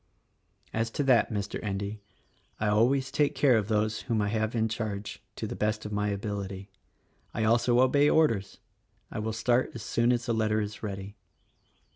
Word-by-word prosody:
"As 115 +1 0
to 145 - +2
that, 130 -4 +4
Mr. 100 -1 -3
Endy, 100 +1 -3 0.6
I 110 - +1
always 130 +6 +2
take 145 +1 +1
care 135 -4 +4
of 105 -3 +1
those 110 0 0
whom 115 -2 +2
I 105 -1 +1
have 110 +1 -1
in 110 -1 +2
charge, 105 -2 -4
to - - -4
the - - -5
best 110 0 -1
of 105 - -5
my 105 0 0
ability. 100 -1 -4 0.7
I 110 - 0
also 120 +2 +3
obey 140 +3 +4
orders. 115 -12 +2 0.5
I - - -4
will 110 +1 -2
start 120 +3 +1
as 115 - -6
soon 120 +1 +2
as 120 0 0
the 120 - 0
letter 110 -1 +1
is 105 0 -4
ready." 100 -1 -6
110 Hz, 180 wpm, -28 LUFS, 105-120 Hz, 0.7 s, that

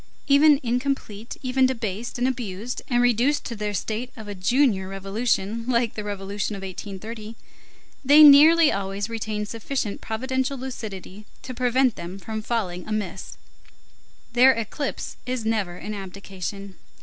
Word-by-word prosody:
Even 290 0 +6
incomplete, 240 -3 -2
even 260 0 +3
debased 230 -3 -4
and 245 +1 +1
abused 235 -2 -4
and 245 -1 +2
reduced 245 +5 +2
to 235 - -4
the 210 -1 -3
state 225 +6 -3
of 220 -2 -9
a 205 - -5
junior 200 +1 +2
revolution 200 +2 -1
like 235 -2 +1
the 210 - -5
Revolution 205 0 -3
of 195 - -8
1830, 210 +4 -7 0.7
they 290 +3 +8
nearly 305 +2 +8
always 200 +2 -3
retain 215 -2 -3
sufficient 230 0 -4
providential 260 +4 -2
lucidity 215 -6 -7 0.2
to 255 - -6
prevent 250 0 +2
them 175 +3 -7
from 220 +2 -5
falling 195 -6 -3
amiss. 210 -4 -4 1.0
Their 255 +2 +7
eclipse 230 +5 -4
is 250 -3 -2
never 210 -6 -1
an 215 - -6
abdication. 195 0 -7
220 Hz, 135 wpm, -24 LUFS, 200-255 Hz, 1.0 s, they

